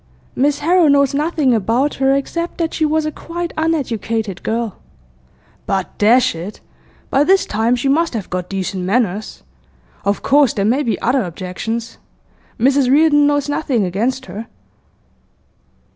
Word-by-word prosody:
'Miss 285 Hz, +2 st, +2 dB
Harrow 350 Hz, -1 st, +4 dB
knows 280 Hz, -1 st, +3 dB
nothing 295 Hz, -2 st, +1 dB
about 235 Hz, +6 st, +1 dB
her, 270 Hz, 0 st, +4 dB
except 335 Hz, +5 st, -3 dB
that 330 Hz, -2 st, -2 dB
she 315 Hz, -, +1 dB
was 310 Hz, 0 st, +1 dB
a 310 Hz, -, -2 dB
quite 340 Hz, +2 st, -6 dB
uneducated 230 Hz, -, -2 dB
girl.' 225 Hz, -2 st, -2 dB, 0.9 s
'But, 195 Hz, -2 st, -2 dB
dash 235 Hz, +5 st, +4 dB
it! 170 Hz, +6 st, -8 dB, 0.5 s
by 275 Hz, -, +4 dB
this 385 Hz, +4 st, +3 dB
time 225 Hz, +3 st, +1 dB
she 245 Hz, +3 st, -2 dB
must 320 Hz, 0 st, +1 dB
have 210 Hz, -4 st, -4 dB
got 180 Hz, 0 st, -3 dB
decent 190 Hz, -1 st, -3 dB
manners. 210 Hz, 0 st, -1 dB, 0.6 s
Of 200 Hz, 0 st, -1 dB
course 280 Hz, -3 st, +4 dB
there 200 Hz, -, -1 dB
may 250 Hz, +7 st, +2 dB
be 235 Hz, -6 st, -1 dB
other 255 Hz, +3 st, +2 dB
objections. 200 Hz, +5 st, -5 dB, 0.6 s
Mrs 270 Hz, +2 st, +3 dB
Reardon 290 Hz, +1 st, +5 dB
knows 290 Hz, -1 st, +1 dB
nothing 270 Hz, -7 st, 0 dB
against 235 Hz, +9 st, -2 dB
her. 205 Hz, +5 st, -8 dB
255 Hz, 145 wpm, -18 LUFS, 210-290 Hz, 0.9 s, Reardon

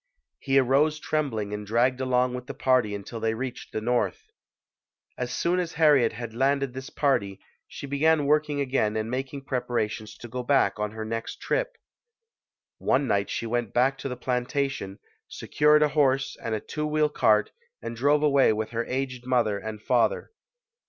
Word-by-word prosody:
He 135 Hz, 0 st, +1 dB
arose 140 Hz, +4 st, +3 dB
trembling 115 Hz, -12 st, -2 dB
and 105 Hz, 0 st, -4 dB
dragged 120 Hz, +5 st, +1 dB
along 125 Hz, -1 st, +1 dB
with 125 Hz, 0 st, -6 dB
the -, -, -6 dB
party 125 Hz, -6 st, +2 dB
until 100 Hz, +3 st, -7 dB
they 110 Hz, 0 st, 0 dB
reached 125 Hz, +1 st, -6 dB
the 110 Hz, -, -3 dB
North. 125 Hz, -, 0 dB, 0.9 s
As -, -, -4 dB
soon 175 Hz, +2 st, 0 dB
as 175 Hz, -2 st, -3 dB
Harriet 150 Hz, -7 st, +4 dB
had 120 Hz, -2 st, -7 dB
landed 135 Hz, +1 st, +1 dB
this 130 Hz, +1 st, -7 dB
party, 100 Hz, -9 st, 0 dB, 0.3 s
she -, -, -8 dB
began 145 Hz, +2 st, +2 dB
working 150 Hz, 0 st, +1 dB
again 130 Hz, -6 st, 0 dB
and 110 Hz, +1 st, -3 dB
making 135 Hz, +2 st, -4 dB
preparations 110 Hz, -4 st, -3 dB
to 120 Hz, -, -9 dB
go 125 Hz, +2 st, -4 dB
back 120 Hz, -6 st, +2 dB
on 105 Hz, 0 st, -1 dB
her 110 Hz, 0 st, -5 dB
next 115 Hz, +1 st, -5 dB
trip. -, -, -2 dB, 1.0 s
One 140 Hz, +2 st, +2 dB
night 100 Hz, -5 st, 0 dB
she -, -, -3 dB
went 120 Hz, -1 st, -2 dB
back 130 Hz, +3 st, +3 dB
to 135 Hz, -, -4 dB
the 125 Hz, -, -5 dB
plantation, 125 Hz, -4 st, -2 dB, 0.3 s
secured 150 Hz, 0 st, +3 dB
a 150 Hz, -, +3 dB
horse 135 Hz, -2 st, +1 dB
and 115 Hz, -1 st, -2 dB
a -, -, -2 dB
two 150 Hz, +7 st, -4 dB
wheel 150 Hz, 0 st, +2 dB
cart 105 Hz, -7 st, +2 dB, 0.3 s
and 115 Hz, -, -6 dB
drove 145 Hz, +5 st, +2 dB
away 140 Hz, -5 st, +4 dB
with 110 Hz, +1 st, -3 dB
her 115 Hz, 0 st, -2 dB
aged 130 Hz, -1 st, -3 dB
mother 115 Hz, -5 st, +1 dB
and 110 Hz, +1 st, -6 dB
father. 120 Hz, -3 st, +1 dB
125 Hz, 175 wpm, -26 LUFS, 115-140 Hz, 1.0 s, Harriet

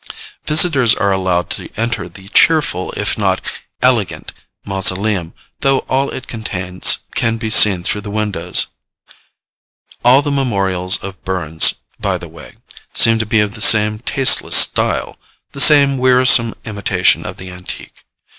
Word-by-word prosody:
Visitors 150 Hz, -7 st, +3 dB
are 100 Hz, -, -2 dB
allowed 95 Hz, -2 st, -3 dB
to -, -, -5 dB
enter 115 Hz, -4 st, -4 dB
the 95 Hz, +3 st, -14 dB
cheerful, 145 Hz, -, 0 dB
if -, -, -4 dB
not -, -, -1 dB, 0.4 s
elegant 120 Hz, -8 st, -2 dB, 0.3 s
mausoleum, 95 Hz, -2 st, -1 dB, 0.3 s
though 135 Hz, -1 st, -1 dB
all 135 Hz, +1 st, -2 dB
it 130 Hz, -, -9 dB
contains 95 Hz, -6 st, 0 dB, 0.2 s
can 115 Hz, 0 st, -2 dB
be 110 Hz, -1 st, -6 dB
seen 95 Hz, -5 st, +5 dB
through 105 Hz, -, -4 dB
the 105 Hz, -, -10 dB
windows. 105 Hz, -5 st, -1 dB, 1.4 s
All 130 Hz, +4 st, +3 dB
the 145 Hz, -, -3 dB
memorials 95 Hz, -9 st, -1 dB
of 95 Hz, 0 st, -11 dB
Burns, 80 Hz, -4 st, +1 dB, 0.2 s
by -, -, -3 dB
the -, -, -11 dB
way, -, -, -16 dB, 0.4 s
seem 115 Hz, 0 st, +4 dB
to 110 Hz, -, -4 dB
be 110 Hz, 0 st, 0 dB
of 105 Hz, 0 st, -4 dB
the 110 Hz, -, -8 dB
same 105 Hz, -1 st, +5 dB
tasteless 130 Hz, +3 st, +3 dB
style -, -, +2 dB, 0.3 s
the 140 Hz, -, 0 dB
same 140 Hz, -3 st, +5 dB
wearisome 125 Hz, -2 st, +3 dB
imitation 105 Hz, -3 st, -1 dB
of -, -, -9 dB
the 95 Hz, 0 st, -8 dB
antique. 90 Hz, 0 st, -10 dB
105 Hz, 145 wpm, -14 LUFS, 95-125 Hz, 1.4 s, seen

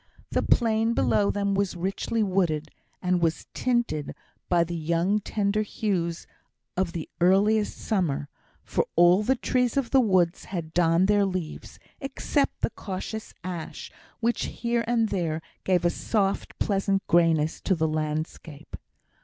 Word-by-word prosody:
The -, -, +1 dB
plain 225 Hz, -1 st, +2 dB
below 205 Hz, -1 st, +2 dB
them 200 Hz, -1 st, 0 dB
was 195 Hz, -1 st, 0 dB
richly 195 Hz, +5 st, -1 dB
wooded, 170 Hz, -6 st, 0 dB, 0.3 s
and 180 Hz, -1 st, +1 dB
was 165 Hz, -1 st, 0 dB
tinted 240 Hz, -, -1 dB, 0.3 s
by 175 Hz, -1 st, +4 dB
the 170 Hz, +1 st, -5 dB
young 170 Hz, +5 st, +1 dB
tender 210 Hz, 0 st, 0 dB
hues 185 Hz, -6 st, -2 dB, 0.5 s
of 180 Hz, -2 st, -1 dB
the 165 Hz, -3 st, -4 dB
earliest 205 Hz, +4 st, +3 dB
summer, 165 Hz, -9 st, -1 dB, 0.4 s
for -, -, -1 dB
all 175 Hz, +3 st, +6 dB
the 260 Hz, +5 st, +2 dB
trees 250 Hz, 0 st, 0 dB
of 265 Hz, -4 st, 0 dB
the 270 Hz, -, +6 dB
wood 185 Hz, -6 st, +3 dB
had 165 Hz, -4 st, -6 dB
donned 170 Hz, +1 st, +3 dB
their 205 Hz, 0 st, +4 dB
leaves 180 Hz, -4 st, -5 dB, 0.2 s
except 275 Hz, +1 st, -1 dB
the -, -, 0 dB
cautious 205 Hz, +3 st, -6 dB
ash, 175 Hz, -3 st, -6 dB, 0.3 s
which 235 Hz, 0 st, +1 dB
here 235 Hz, 0 st, -1 dB
and 230 Hz, -2 st, +2 dB
there 165 Hz, -5 st, -1 dB, 0.2 s
gave 180 Hz, -2 st, +2 dB
a 175 Hz, -, +4 dB
soft, 200 Hz, -1 st, -1 dB
pleasant 195 Hz, -1 st, 0 dB
greyness 165 Hz, -2 st, +2 dB
to 190 Hz, -, +1 dB
the 160 Hz, -1 st, +1 dB
landscape. 155 Hz, 0 st, -4 dB
190 Hz, 145 wpm, -26 LUFS, 170-215 Hz, 0.5 s, all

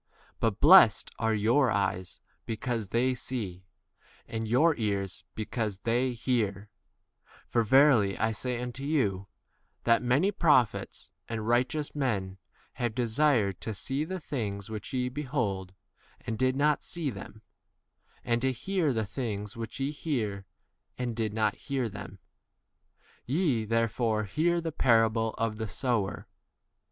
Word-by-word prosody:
But -, -, 0 dB
blessed -, -, +7 dB
are 110 Hz, -1 st, +1 dB
your 120 Hz, +6 st, +3 dB
eyes 95 Hz, -3 st, -1 dB, 0.3 s
because 115 Hz, -1 st, -2 dB
they 125 Hz, +5 st, +1 dB
see, 100 Hz, -8 st, -5 dB, 0.6 s
and 115 Hz, 0 st, -3 dB
your 150 Hz, +8 st, +4 dB
ears 100 Hz, -4 st, -2 dB
because 110 Hz, -2 st, -3 dB
they 125 Hz, +2 st, +1 dB
hear; 115 Hz, -4 st, 0 dB
W 100 Hz, +2 st, -13 dB, 0.8 s
for 120 Hz, -, +1 dB
verily 115 Hz, -4 st, +5 dB
I 110 Hz, +1 st, +1 dB
say 120 Hz, +2 st, -3 dB
unto 125 Hz, +2 st, -5 dB
you, 105 Hz, -11 st, 0 dB, 0.6 s
that 115 Hz, 0 st, +4 dB
many 135 Hz, +11 st, +2 dB
prophets 145 Hz, -, +1 dB, 0.2 s
and 110 Hz, -1 st, -3 dB
righteous 125 Hz, +5 st, +1 dB
[men] 100 Hz, -9 st, -2 dB, 0.4 s
have 120 Hz, -2 st, -1 dB
desired 120 Hz, -, +1 dB
to 110 Hz, -, -4 dB
see 135 Hz, +8 st, -2 dB
the 185 Hz, +4 st, -4 dB
things 110 Hz, -, -4 dB
which 105 Hz, -1 st, -6 dB
ye 125 Hz, -1 st, 0 dB
behold 125 Hz, -9 st, -3 dB, 0.5 s
and 110 Hz, -, -4 dB
did 130 Hz, +3 st, +1 dB
not 150 Hz, +1 st, +2 dB
see 165 Hz, -5 st, -2 dB
[them], 105 Hz, +1 st, -10 dB, 0.8 s
and 115 Hz, 0 st, 0 dB
to 130 Hz, +1 st, +2 dB
hear 165 Hz, +3 st, 0 dB
the 110 Hz, -2 st, -1 dB
things 105 Hz, -2 st, -4 dB
which 115 Hz, +3 st, -6 dB
ye 135 Hz, +2 st, -1 dB
hear 110 Hz, -, -3 dB, 0.5 s
and 120 Hz, -2 st, -3 dB
did 110 Hz, -2 st, -1 dB
not 110 Hz, -1 st, +1 dB
18 -, -, -21 dB
hear 130 Hz, -4 st, -1 dB
[them]. 100 Hz, -1 st, -9 dB, 1.1 s
Ye, 135 Hz, -6 st, +1 dB
therefore, 115 Hz, 0 st, +1 dB
hear 155 Hz, -, +1 dB
19 170 Hz, -1 st, -1 dB
the 165 Hz, -, -2 dB
parable 115 Hz, -5 st, +2 dB
of 115 Hz, -1 st, -1 dB
the 110 Hz, 0 st, -3 dB
sower. 110 Hz, -3 st, -2 dB
115 Hz, 145 wpm, -29 LUFS, 105-130 Hz, 1.1 s, blessed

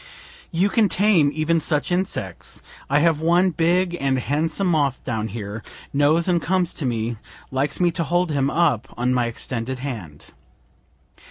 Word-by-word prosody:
You 180 Hz, +3 st, +2 dB
can 215 Hz, -2 st, +3 dB
tame 185 Hz, -8 st, +4 dB
even 155 Hz, +2 st, +1 dB
such 150 Hz, +1 st, -1 dB
insects; 175 Hz, -, -3 dB, 0.3 s
I 145 Hz, +2 st, +3 dB
have 160 Hz, -2 st, +2 dB
one 175 Hz, +3 st, +3 dB
big 175 Hz, +2 st, +1 dB
and 135 Hz, -1 st, +1 dB
handsome 155 Hz, +8 st, -1 dB
moth 145 Hz, -7 st, +1 dB
down 110 Hz, -3 st, -2 dB
here, 105 Hz, 0 st, -6 dB, 0.3 s
knows 150 Hz, +5 st, +3 dB
and 175 Hz, -2 st, +2 dB
comes 185 Hz, -1 st, 0 dB
to 140 Hz, -, -3 dB
me, 115 Hz, -1 st, -2 dB, 0.3 s
likes 135 Hz, +2 st, -1 dB
me 175 Hz, -1 st, +3 dB
to 170 Hz, 0 st, -1 dB
hold 175 Hz, +2 st, +1 dB
him 140 Hz, -2 st, +1 dB
up 150 Hz, -7 st, +1 dB
on 125 Hz, +1 st, +1 dB
my 125 Hz, -2 st, +1 dB
extended 120 Hz, +2 st, -4 dB
hand. 110 Hz, -, -7 dB
150 Hz, 160 wpm, -22 LUFS, 125-175 Hz, 0.3 s, tame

